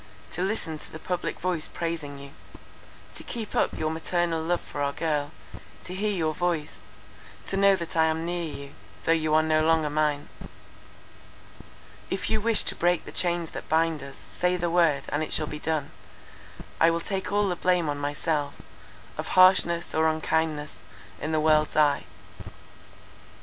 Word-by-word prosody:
to 175 Hz, -, -4 dB
listen 185 Hz, -5 st, -2 dB
to -, -, -9 dB
the -, -, -7 dB
public 180 Hz, +2 st, -3 dB
voice 175 Hz, -3 st, 0 dB
praising 160 Hz, -4 st, -4 dB
you; 140 Hz, 0 st, -10 dB, 0.8 s
to -, -, -6 dB
keep 225 Hz, -3 st, -6 dB
up -, -, +1 dB
your 155 Hz, 0 st, -1 dB
paternal 165 Hz, 0 st, 0 dB
love 175 Hz, +2 st, 0 dB
for 145 Hz, -, -7 dB
our 140 Hz, 0 st, +1 dB
girl; 150 Hz, -3 st, -1 dB, 0.5 s
to 180 Hz, -, -6 dB
hear 205 Hz, +3 st, -1 dB
your 160 Hz, -5 st, 0 dB
voice; 170 Hz, -2 st, -2 dB, 0.7 s
to -, -, -2 dB
know 200 Hz, 0 st, +5 dB
that 170 Hz, -3 st, -6 dB
I 160 Hz, -1 st, +5 dB
am 160 Hz, +1 st, 0 dB
near 175 Hz, 0 st, -2 dB
you, 140 Hz, -1 st, -9 dB, 0.3 s
though -, -, +2 dB
you 155 Hz, -1 st, +2 dB
are 155 Hz, -, +5 dB
no 155 Hz, 0 st, +2 dB
longer 160 Hz, -2 st, +2 dB
mine. 150 Hz, -1 st, 0 dB, 1.8 s
"If 190 Hz, -, -2 dB
you 215 Hz, -, +2 dB
wish 225 Hz, -1 st, +3 dB
to -, -, -1 dB
break 175 Hz, 0 st, +1 dB
the -, -, -8 dB
chains 175 Hz, -2 st, 0 dB
that -, -, -8 dB
bind 160 Hz, -1 st, +2 dB
us, 140 Hz, 0 st, -9 dB
say 180 Hz, 0 st, -1 dB
the 175 Hz, -1 st, -1 dB
word, 165 Hz, -5 st, +3 dB
and 145 Hz, -, -1 dB
it 155 Hz, -, -3 dB
shall 155 Hz, -, +2 dB
be 150 Hz, 0 st, -6 dB
done—I 160 Hz, +1 st, -3 dB
will 165 Hz, 0 st, 0 dB
take 190 Hz, +2 st, -3 dB
all 205 Hz, 0 st, +2 dB
the 180 Hz, -, 0 dB
blame 180 Hz, -2 st, +1 dB
on 145 Hz, -1 st, -2 dB
myself, 145 Hz, 0 st, -2 dB, 0.6 s
of -, -, -3 dB
harshness 185 Hz, -2 st, +5 dB
or 160 Hz, 0 st, +3 dB
unkindness, 155 Hz, -1 st, -1 dB, 0.4 s
in 155 Hz, -, -2 dB
the 155 Hz, -, +2 dB
world's 155 Hz, 0 st, +3 dB
eye. 150 Hz, -2 st, +3 dB
160 Hz, 170 wpm, -27 LUFS, 155-175 Hz, 1.8 s, know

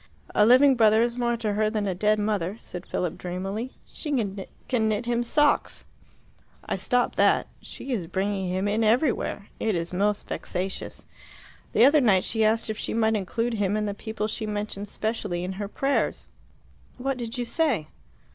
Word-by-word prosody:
"A 210 Hz, -, +5 dB
living 265 Hz, +3 st, +7 dB
brother 220 Hz, -2 st, +5 dB
is 240 Hz, 0 st, -1 dB
more 240 Hz, -1 st, 0 dB
to 220 Hz, -3 st, -1 dB
her 215 Hz, +1 st, +2 dB
than 215 Hz, -2 st, -1 dB
a 190 Hz, -, 0 dB
dead 210 Hz, +4 st, +2 dB
mother," 205 Hz, -2 st, -1 dB
said 180 Hz, 0 st, -9 dB
Philip 180 Hz, -3 st, -2 dB
dreamily. 195 Hz, +7 st, -4 dB
"She 300 Hz, -, -6 dB, 0.6 s
can 225 Hz, -4 st, +1 dB
knit 215 Hz, +2 st, -1 dB
him 240 Hz, 0 st, 0 dB
socks." 295 Hz, +5 st, +1 dB, 0.8 s
"I -, -, -1 dB
stopped 245 Hz, -1 st, +1 dB
that. -, -, +4 dB, 0.2 s
She 270 Hz, -, -6 dB
is 185 Hz, -8 st, -2 dB
bringing 190 Hz, +1 st, -1 dB
him 185 Hz, +2 st, 0 dB
in 215 Hz, +2 st, +1 dB
everywhere. 225 Hz, -3 st, +1 dB
It 220 Hz, -3 st, 0 dB
is 170 Hz, +1 st, -3 dB
most 205 Hz, +2 st, 0 dB
vexatious. 190 Hz, +2 st, -4 dB, 0.7 s
The 235 Hz, -, +6 dB
other 290 Hz, +2 st, +6 dB
night 195 Hz, -7 st, +4 dB
she 225 Hz, -1 st, +1 dB
asked 220 Hz, +1 st, +2 dB
if 220 Hz, -1 st, -4 dB
she -, -, -3 dB
might 220 Hz, -1 st, +2 dB
include 230 Hz, +4 st, -1 dB
him 205 Hz, -1 st, 0 dB
in 210 Hz, -, -1 dB
the 205 Hz, -, -2 dB
people 215 Hz, +1 st, -4 dB
she 215 Hz, 0 st, -4 dB
mentions 205 Hz, -1 st, -4 dB
specially 205 Hz, -6 st, -2 dB
in 185 Hz, -, -3 dB
her 205 Hz, -, -2 dB
prayers." 275 Hz, +6 st, 0 dB, 0.7 s
"What 265 Hz, +1 st, -2 dB
did 235 Hz, 0 st, -4 dB
you 245 Hz, -, -1 dB
say?" 270 Hz, -, +1 dB
215 Hz, 180 wpm, -26 LUFS, 200-235 Hz, 0.8 s, living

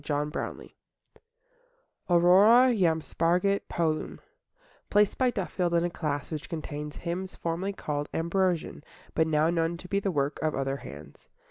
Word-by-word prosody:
Monday 150 Hz, 0 st, -1 dB
Morning -, -, -6 dB, 1.4 s
AURORA 200 Hz, +9 st, +6 dB
JAM 165 Hz, -5 st, +2 dB
SPARGIT 180 Hz, +6 st, 0 dB
POLUM 160 Hz, -2 st, -1 dB, 0.7 s
Placed 205 Hz, -1 st, +3 dB
by 255 Hz, -1 st, +4 dB
Duffield 180 Hz, -5 st, -1 dB
in 170 Hz, -, +3 dB
a 175 Hz, -, -2 dB
class 145 Hz, -3 st, -3 dB
which 155 Hz, -2 st, -5 dB
contains 150 Hz, -2 st, -5 dB
hymns 180 Hz, +2 st, -5 dB
formerly 175 Hz, +4 st, -3 dB
called 145 Hz, -5 st, -4 dB
Ambrosian, 170 Hz, -2 st, -1 dB, 0.3 s
but 160 Hz, -, +2 dB
now 155 Hz, +1 st, +2 dB
known 165 Hz, 0 st, 0 dB
to 180 Hz, -, -11 dB
be 200 Hz, +2 st, 0 dB
the 200 Hz, -, -1 dB
work 145 Hz, -4 st, -1 dB
of 155 Hz, -1 st, 0 dB
other 135 Hz, 0 st, -1 dB
hands. 70 Hz, -, -12 dB
170 Hz, 145 wpm, -28 LUFS, 150-185 Hz, 1.4 s, AURORA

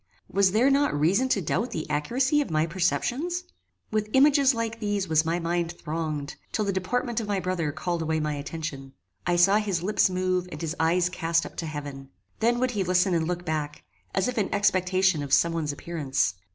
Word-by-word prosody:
Was 195 Hz, -1 st, +3 dB
there 240 Hz, +7 st, +4 dB
not 280 Hz, -, +2 dB
reason 195 Hz, -, +2 dB
to 200 Hz, -7 st, +1 dB
doubt 200 Hz, -, -1 dB
the 155 Hz, -, -4 dB
accuracy 255 Hz, -, +1 dB
of 285 Hz, -, -3 dB
my 155 Hz, 0 st, +1 dB
perceptions? 245 Hz, -, -1 dB, 0.5 s
With 215 Hz, -1 st, -1 dB
images 275 Hz, -1 st, +5 dB
like 230 Hz, 0 st, -3 dB
these 205 Hz, -3 st, -1 dB
was 160 Hz, -1 st, +3 dB
my 165 Hz, +1 st, 0 dB
mind 170 Hz, 0 st, -1 dB
thronged, 155 Hz, -3 st, -4 dB
till 215 Hz, -, 0 dB
the 200 Hz, -, 0 dB
deportment 235 Hz, +5 st, -1 dB
of 220 Hz, -, -4 dB
my 200 Hz, -2 st, 0 dB
brother 180 Hz, -5 st, -1 dB
called 170 Hz, +3 st, -3 dB
away 160 Hz, 0 st, 0 dB
my 150 Hz, -1 st, -1 dB
attention. 145 Hz, -2 st, -6 dB, 0.3 s
I 175 Hz, -, +2 dB
saw 195 Hz, +4 st, +5 dB
his 200 Hz, -5 st, -1 dB
lips 200 Hz, 0 st, +3 dB
move 185 Hz, 0 st, -1 dB
and 150 Hz, -, -7 dB
his 165 Hz, +1 st, -3 dB
eyes 170 Hz, +2 st, +3 dB
cast 165 Hz, -2 st, 0 dB
up -, -, -9 dB
to 165 Hz, -, -3 dB
heaven. 145 Hz, -3 st, -7 dB, 0.3 s
Then 235 Hz, +2 st, +2 dB
would 255 Hz, 0 st, +1 dB
he 205 Hz, -5 st, -1 dB
listen 180 Hz, +1 st, +2 dB
and 165 Hz, -2 st, +1 dB
look 175 Hz, 0 st, -3 dB
back, 150 Hz, -2 st, -3 dB, 0.3 s
as 190 Hz, -, +2 dB
if 250 Hz, -2 st, -1 dB
in 200 Hz, -, -1 dB
expectation 185 Hz, -3 st, +2 dB
of 140 Hz, -1 st, -6 dB
some 170 Hz, +2 st, +4 dB
one's 160 Hz, -3 st, -1 dB
appearance. 145 Hz, -, -1 dB
180 Hz, 205 wpm, -26 LUFS, 160-210 Hz, 0.5 s, images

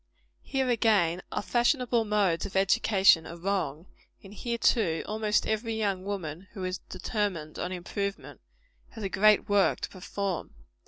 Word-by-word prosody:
Here, 265 Hz, -1 st, -1 dB
again, 210 Hz, -8 st, +2 dB
our 210 Hz, -, -2 dB
fashionable 240 Hz, -1 st, +2 dB
modes 200 Hz, -4 st, +1 dB
of 195 Hz, -, -12 dB
education 190 Hz, -3 st, +4 dB
are 170 Hz, -, -8 dB
wrong; 175 Hz, -4 st, -2 dB, 0.4 s
and 195 Hz, 0 st, -12 dB
here, 235 Hz, +2 st, -3 dB
too, 195 Hz, -9 st, +2 dB
almost 215 Hz, 0 st, 0 dB
every 220 Hz, +1 st, -1 dB
young 200 Hz, -4 st, -1 dB
woman 185 Hz, -3 st, -5 dB
who 190 Hz, -, -6 dB
is 185 Hz, 0 st, -3 dB
determined 185 Hz, -9 st, -3 dB
on 180 Hz, -, -3 dB
improvement, 200 Hz, +2 st, -5 dB, 0.5 s
has 225 Hz, -, -8 dB
a 195 Hz, -, -1 dB
great 210 Hz, +2 st, +4 dB
work 205 Hz, -1 st, +3 dB
to -, -, -3 dB
perform. 190 Hz, -, -4 dB
200 Hz, 150 wpm, -28 LUFS, 185-215 Hz, 0.5 s, education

